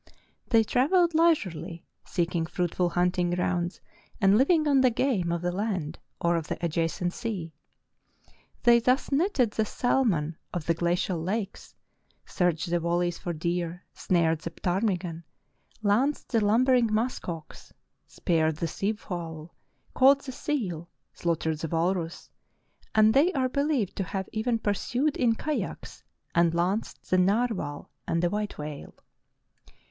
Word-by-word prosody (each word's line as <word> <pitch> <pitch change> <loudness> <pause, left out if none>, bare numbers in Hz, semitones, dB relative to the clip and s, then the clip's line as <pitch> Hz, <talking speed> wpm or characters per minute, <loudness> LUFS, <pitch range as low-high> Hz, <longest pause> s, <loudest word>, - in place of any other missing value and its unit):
They 225 -2 +4
travelled 335 - +3
leisurely, 190 - +1 0.2
seeking 170 -2 -1
fruitful 175 0 0
hunting 180 0 +1
grounds 175 0 -1 0.4
and 195 -1 +5
living 305 +6 +3
on 275 -2 +4
the 255 - +5
game 225 -8 0
of 170 0 -2
the 175 - 0
land 185 -5 -3 0.2
or 170 0 +2
of 160 -2 -4
the - - -3
adjacent 170 +2 -1
sea. 185 -8 -4 1.1
They 235 -1 +6
thus 255 +5 +1
netted 275 - +2
the 220 - 0
salmon 205 - 0 0.2
of 170 -3 -3
the 165 - +2
gla 170 +1 0
cial 175 -2 -1
lakes, 200 +2 -4 0.5
searched 170 -2 0
the 175 - +2
valleys 175 +1 0
for 175 - -4
deer, 170 +1 -3
snared 165 -3 +1
the 170 - -5
ptarmigan, 180 -1 -2 0.6
lanced 245 +9 +1
the 225 -4 +2
lumbering 240 +2 +3
musk 225 -1 -1
ox, 165 -2 -8 0.4
speared 160 -3 0
the 165 +2 -2
sea 195 +6 -1
fowl, 170 -6 -7 0.4
caught 275 +1 +5
the 270 - -6
seal, 190 - -3 0.2
slaughtered 160 -2 -1
the 165 - -3
walrus, 170 +1 -2 0.6
and 215 0 +6
they 300 +7 +4
are 260 -3 +1
beHeved 280 - 0
to 195 - -2
have 190 +1 -4
even 230 +2 0
pursued 245 +7 -1
in 235 -3 +2
kayaks 300 +5 -4 0.3
and 170 0 +3
lanced 185 +6 -1
the 185 - +4
narwhal 195 -6 0 0.2
and 165 +1 0
the 175 - +2
white 210 0 -3
whale. 150 -1 -7
185 Hz, 140 wpm, -27 LUFS, 170-235 Hz, 1.1 s, They